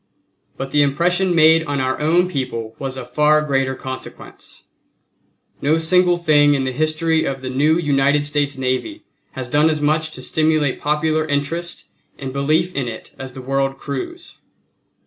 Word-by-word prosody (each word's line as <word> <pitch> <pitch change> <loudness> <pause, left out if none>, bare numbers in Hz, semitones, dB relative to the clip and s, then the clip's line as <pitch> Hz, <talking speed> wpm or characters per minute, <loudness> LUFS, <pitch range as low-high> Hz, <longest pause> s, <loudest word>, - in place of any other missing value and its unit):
But 135 0 -5
the 145 - +4
impression 175 +6 +1
made 160 0 +6
on 145 -3 -2
our 130 0 -1
own 170 +4 +2
people 125 -8 -4
was 135 -1 -5
of 125 -1 -8
far 150 +3 +4
greater 135 -2 0
consequence. 130 0 -9 1.0
No 150 +3 +2
single 175 +2 +3
thing 145 -4 +4
in 135 - 0
the 130 - -1
history 155 +3 +1
of 135 -1 -4
the 130 - -4
new 150 +5 +2
United 145 -2 +2
States 145 -1 -1
Navy 130 - -2 0.3
has 130 -2 -5
done 150 +5 +3
as 155 -1 0
much 155 +2 +1
to 130 - -8
stimulate 155 -3 +1
popular 155 +1 0
interest 155 +4 -3 0.3
and 135 -2 -6
belief 155 +6 +1
in 135 -6 -2
it 115 - -8
as 130 -1 -7
the 130 - -9
world 135 +1 -1
cruise. 150 - -7
145 Hz, 165 wpm, -19 LUFS, 135-160 Hz, 1.0 s, made